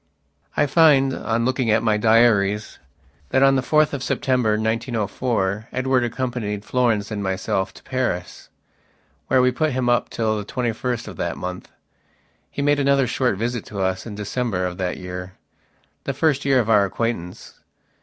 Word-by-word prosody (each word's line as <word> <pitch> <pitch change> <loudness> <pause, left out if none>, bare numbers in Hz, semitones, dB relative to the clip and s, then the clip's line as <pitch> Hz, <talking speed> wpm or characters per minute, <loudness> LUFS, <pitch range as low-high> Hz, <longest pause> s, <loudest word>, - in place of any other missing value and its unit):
I 145 - +4
find, 140 -3 +4
on 115 0 -1
looking 130 -2 0
at 110 +1 +3
my 110 -2 +2
diaries, 105 -2 +2 0.5
that 130 - +3
on 135 0 +5
the 130 - +2
4th 155 +3 +2
of 140 - -3
September, 125 -5 +1
1904, 110 -1 -1
Edward 130 0 +1
accompanied 120 -4 -3
Florence 115 -5 0
and 105 -1 -3
myself 95 0 -1
to - - -15
Paris, 120 -9 -3 0.8
where 130 -1 +3
we 125 - +4
put 155 +3 0
him 125 -1 0
up 120 - +2
till 110 -2 -1
the - - -4
twenty 120 +2 -2
first 120 +1 -3
of - - -9
that - - -3
month. 90 0 -6 0.8
He 140 - -4
made 145 0 +3
another 140 -1 +3
short 125 -3 0
visit 115 +1 -2
to 100 - -7
us 95 +3 -1
in 105 - -7
December 105 -2 -2
of 90 0 -5
that 90 -1 -2
yearthe 90 0 -7 0.8
first 140 -1 +1
year 135 -2 +4
of 115 - 0
our 105 -3 +5
acquaintance. 100 -3 -4
115 Hz, 165 wpm, -22 LUFS, 105-130 Hz, 0.8 s, on